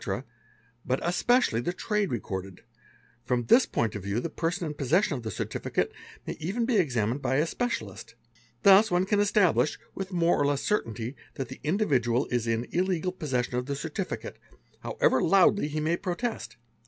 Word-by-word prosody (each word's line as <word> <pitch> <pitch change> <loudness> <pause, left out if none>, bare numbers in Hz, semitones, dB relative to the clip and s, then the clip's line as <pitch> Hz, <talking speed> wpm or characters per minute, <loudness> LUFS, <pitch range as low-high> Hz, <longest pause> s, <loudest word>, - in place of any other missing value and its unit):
but 130 +1 0
especially 180 - +2
the 175 - -1
trade 205 +2 -1
recorded: 95 -5 -5 0.6
from 125 0 0
this 235 - +5
point 115 -3 -1
of 105 - -5
view 100 +4 -2
the 160 +6 -4
erson 175 +3 0
in 150 - -3
possession 150 - +1
of 125 - -5
the 110 - -5
certificate 95 - -2 0.3
may - - -3
even 195 +9 -1
be 235 -2 +2
examined 125 - 0
by 130 - 0
a 145 - +3
specia 245 +8 -2
'list. - - -11 0.5
Thus 200 +2 +7
one 180 0 +2
can 205 +1 +1
establish, 205 -6 +3 0.2
with 195 0 -5
more 170 -3 +2
or 140 - +3
less 140 -1 0
certainty, 120 - -2 0.2
that 135 -3 -4
the - - -9
dividual 135 - +1
is 120 -2 0
in 115 +1 0
illegal 180 0 0
possession 130 -8 -2
of 125 +1 -2
the 140 - -2
certificate, 160 +6 -5 0.4
however - - +1
loudly 195 -2 +4
he 155 +1 -3
may 160 +3 0
'protest. 215 +7 -4
155 Hz, 175 wpm, -28 LUFS, 125-190 Hz, 0.6 s, Thus